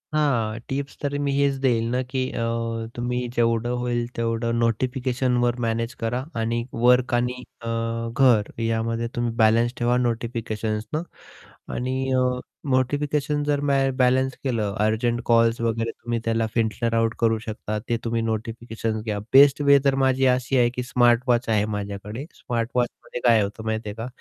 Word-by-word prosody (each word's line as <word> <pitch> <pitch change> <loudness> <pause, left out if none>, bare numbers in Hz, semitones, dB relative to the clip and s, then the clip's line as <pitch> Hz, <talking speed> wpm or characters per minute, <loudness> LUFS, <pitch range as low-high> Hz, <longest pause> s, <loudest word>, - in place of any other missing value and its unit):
हां, 115 -7 +1
टिप्स 140 +1 -4
तरी 145 0 -2
मी 140 - +1
हेच 140 -1 +3
देईल 115 -3 +3
ना, 125 +1 +1
की 130 +1 -3
अ, 115 - -3 0.5
तुम्ही 125 +1 -2
जेवढं 115 0 +1
होईल 120 -1 0
तेवढं 115 0 -1
नोटिफिकेशनवर 125 +1 0
मॅनेज 115 +2 -1
करा 120 +3 -1 0.2
आणि 115 +1 -1
वर्क 125 +1 +3
आणि 125 +1 0 0.2
अ, - - -10 0.5
घर 120 -6 +4
यामध्ये 115 +1 -1
तुम्ही 120 -1 0
बॅलन्स 115 +1 +3
ठेवा 120 +1 +2
नोटिफिकेशन्सनं 115 +2 -2 0.7
आणि 125 +1 -2 0.2
अ, 130 0 +3 0.5
नोटिफिकेशन 145 +3 0
जर 145 -1 +1
मॅ 140 - +3 0.2
बॅलन्स 130 +1 +2
केलं, 110 -6 -1
अर्जंट 115 +3 +1
कॉल्स 115 0 +3
वगैरे 115 0 0
तुम्ही 120 0 -4
त्याला 115 0 +1
फिल्टर 115 +1 0
आउट 115 0 +1
करू 115 -1 +3
शकता 110 -1 -5
ते 115 - +2
तुम्ही 115 0 -1
नोटिफिकेशन्स 115 0 -3
घ्या. 105 -2 -2
बेस्ट 140 +1 +7
वे 140 -1 +6
तर 135 -1 +4
माझी 130 0 +3
अशी 130 +1 0
आहे 120 -1 +4
की 125 - -2
स्मार्ट 120 -1 +3
वॉच 120 -1 +2
आहे 105 -1 +2
माझ्याकडे. 105 +6 -6
स्मार्ट 115 -2 -3
वॉचमध्ये 125 0 -2
काय 115 -3 +6
होतं 105 +2 -4
माहिती 110 -1 -2
आहे 105 - -7
का, 115 +2 -5
120 Hz, 160 wpm, -24 LUFS, 115-125 Hz, 0.7 s, बेस्ट